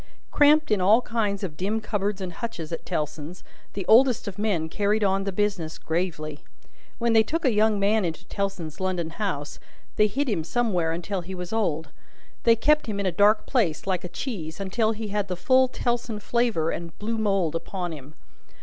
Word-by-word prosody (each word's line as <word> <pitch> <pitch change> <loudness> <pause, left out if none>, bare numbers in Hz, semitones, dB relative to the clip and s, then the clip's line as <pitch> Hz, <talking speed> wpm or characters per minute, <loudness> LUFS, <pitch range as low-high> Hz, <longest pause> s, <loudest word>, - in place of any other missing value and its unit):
Cramped 300 -1 +5
in 205 -3 +3
all 215 +7 +5
kinds 210 -3 -1
of 170 -6 -4
dim 200 +7 -1
cupboards 205 -2 -2
and 180 -2 -4
hutches 175 -9 -5
at 165 - -5
Tellson's, 150 +3 -4 0.3
the 195 -2 -4
oldest 245 0 +5
of 200 0 -6
men 195 -7 0
carried 210 +5 +1
on 195 0 +1
the 195 - -1
business 195 -5 -1
gravely. 160 -3 -3 0.6
When 235 -1 +1
they 225 - +7
took 320 +9 -2
a 255 - +4
young 215 0 +3
man 205 +2 +2
into 170 0 -4
Tellson's 185 -6 -4
London 180 -3 -1
house, 165 -7 -4 0.4
they 210 - +5
hid 275 +7 -1
him 195 -9 0
somewhere 175 -6 0
till 185 +2 -3
he 185 +2 -7
was 180 +2 -6
old. 160 -8 0 0.6
They 230 -1 +7
kept 300 +6 +2
him 205 -2 -3
in 200 - -1
a 185 - +2
dark 205 +5 +4
place, 200 - 0
like 185 -2 -1
a - - -4
cheese, 170 - -5
until 215 +3 0
he 215 -1 -5
had 205 -1 -1
the 180 -2 -3
full 260 +7 +4
Tellson 240 -3 -2
flavour 225 -9 +1
and 170 -1 -6
blue 225 +2 -2
mould 195 -7 +1
upon 175 +1 -4
him. 150 0 -10
200 Hz, 195 wpm, -25 LUFS, 170-220 Hz, 0.6 s, they